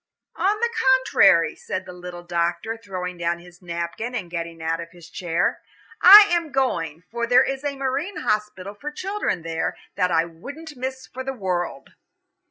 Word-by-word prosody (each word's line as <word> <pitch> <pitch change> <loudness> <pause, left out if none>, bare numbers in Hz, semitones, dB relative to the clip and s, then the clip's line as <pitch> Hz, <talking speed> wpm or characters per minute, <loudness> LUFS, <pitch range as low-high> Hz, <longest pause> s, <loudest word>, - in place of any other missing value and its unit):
"On 415 +2 +1
the 470 0 +1 0.2
contrary," 195 -10 +4
said 185 - -5
the 180 - -9
little 180 -1 -9
doctor, 175 +5 -1
throwing 185 -5 -6
down 170 0 0
his 175 +1 -16
napkin 170 +8 -4
and 180 -7 -4
getting 170 -1 -5
out 160 0 -1
of 170 0 -7
his 170 0 -15
chair. 175 -3 -1 0.4
"I 400 +4 +12
am 335 -3 0
going, 170 - -1
for 235 0 -2
there 245 +1 +6
is 270 +1 -3
a 285 -1 -2
marine 275 +8 -2
hospital 210 -2 -2
for 285 +9 -6
children 370 - -3
there, 165 0 -2 0.2
that 180 - +2
I 165 -1 +2
wouldn't 280 - -10
miss 260 +1 -5
for 260 +1 -7
the 270 0 -3
world." 180 - -3
185 Hz, 175 wpm, -23 LUFS, 170-265 Hz, 0.4 s, I